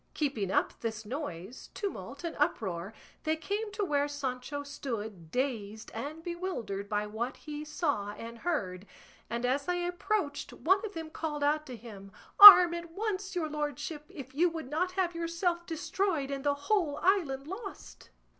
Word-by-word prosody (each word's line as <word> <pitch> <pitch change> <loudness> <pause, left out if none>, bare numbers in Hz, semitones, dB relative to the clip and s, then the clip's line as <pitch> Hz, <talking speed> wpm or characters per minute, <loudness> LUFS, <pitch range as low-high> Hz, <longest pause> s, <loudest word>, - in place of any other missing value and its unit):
Keeping 265 - -1
up - - 0
this 220 -2 -4
noise, 220 - -6
tumult, 400 -4 -5
and 335 - -4
uproar, 195 - -1 0.3
they 315 0 +1
came 410 +6 -3
to 405 0 -1
where 290 -3 +1
Sancho 285 0 -4
stood 220 - -6
dazed 220 - -3
and 295 +8 -6
bewildered 340 - -4
by 210 0 0
what 220 +4 -4
he 300 -1 -7
saw 295 - -1
and 230 +2 -9
heard, 200 - -2 0.4
and 235 +2 -2
as 275 +3 0
they 355 0 0
approached 350 -4 -2
one 380 +5 +2
of 415 -4 -6
them 320 -1 -6
called 295 -3 -3
out 305 +1 +1
to 255 - -7
him, 200 -4 -11 0.3
"Arm 365 -4 +13
at 340 0 -5
once, 395 +1 -3
your 335 -3 0
lordship, 300 0 -4
if 265 -3 -10
you 345 +5 +3
would 320 -5 -7
not 360 +4 0
have 365 -2 0
yourself 340 +1 -2
destroyed 330 -2 -1
and 275 -1 -4
the 285 0 +3
whole 295 0 0
island 320 -9 +2
lost." 390 +5 -9
295 Hz, 165 wpm, -30 LUFS, 240-345 Hz, 0.4 s, Arm